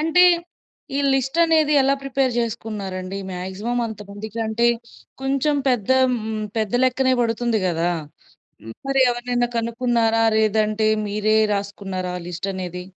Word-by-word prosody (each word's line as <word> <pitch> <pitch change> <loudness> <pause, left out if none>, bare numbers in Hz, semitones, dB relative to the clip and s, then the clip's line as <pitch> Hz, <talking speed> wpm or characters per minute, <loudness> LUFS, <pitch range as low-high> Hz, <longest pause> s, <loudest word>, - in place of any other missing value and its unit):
అంటే, 325 +3 +4 0.7
ఈ - - +1
లిస్టనేది 310 +3 +2
ఎలా 275 +1 +3
ప్రిపేర్ 270 -2 0
జేసుకున్నారండి? 205 -5 -3
మ్యాగ్జిమం 190 +7 -3
అంతమందికంటే, 220 +2 -3 0.6
కొంచెం 275 +2 +1
పెద్ద 245 -3 0 0.2
హ్మ్, 220 -2 -3
పెద్ద 215 -2 -1
లెక్కనే 260 0 +2
బడుతుంది 230 -1 0
గదా! 170 0 0 0.7
హ్మ్. 115 0 -9
మరి 270 -1 +4
ఎవరినైనా 240 0 -1
కనుక్కున్నారా? 230 -1 +1
లేదంటే 215 0 +2 0.2
మీరే 215 +1 +1 0.2
రాసుకున్నారా? 195 -2 -4
లిస్టనేది. 180 0 -5
225 Hz, 105 wpm, -22 LUFS, 200-250 Hz, 0.7 s, అంటే